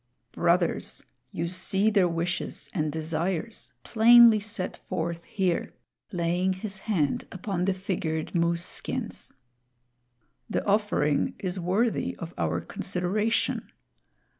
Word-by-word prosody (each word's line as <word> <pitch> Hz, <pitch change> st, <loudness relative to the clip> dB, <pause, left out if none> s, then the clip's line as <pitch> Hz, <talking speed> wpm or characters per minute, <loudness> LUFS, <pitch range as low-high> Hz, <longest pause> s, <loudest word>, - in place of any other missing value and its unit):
"Brothers, 170 Hz, 0 st, 0 dB, 0.3 s
you 170 Hz, -, -2 dB
see 190 Hz, +4 st, +1 dB
their 195 Hz, -4 st, +4 dB
wishes 170 Hz, +1 st, -3 dB
and 155 Hz, -4 st, 0 dB
desires 165 Hz, +6 st, -2 dB
plainly 230 Hz, 0 st, +7 dB
set 205 Hz, -3 st, -4 dB
forth 170 Hz, +1 st, -4 dB
here," 185 Hz, -5 st, -1 dB, 0.4 s
laying 180 Hz, +1 st, +1 dB
his 195 Hz, +1 st, -5 dB
hand 155 Hz, -10 st, +1 dB
upon 185 Hz, -1 st, -2 dB
the 195 Hz, -, +2 dB
figured 170 Hz, -5 st, -3 dB
moose 170 Hz, 0 st, +1 dB
skins. -, -, -3 dB, 1.2 s
"The -, -, -1 dB
offering 205 Hz, -8 st, +1 dB
is 185 Hz, -1 st, -3 dB
worthy 200 Hz, +7 st, 0 dB
of 170 Hz, 0 st, -7 dB
our 85 Hz, +1 st, -1 dB
consideration. 200 Hz, +5 st, -1 dB
180 Hz, 110 wpm, -27 LUFS, 170-205 Hz, 1.2 s, plainly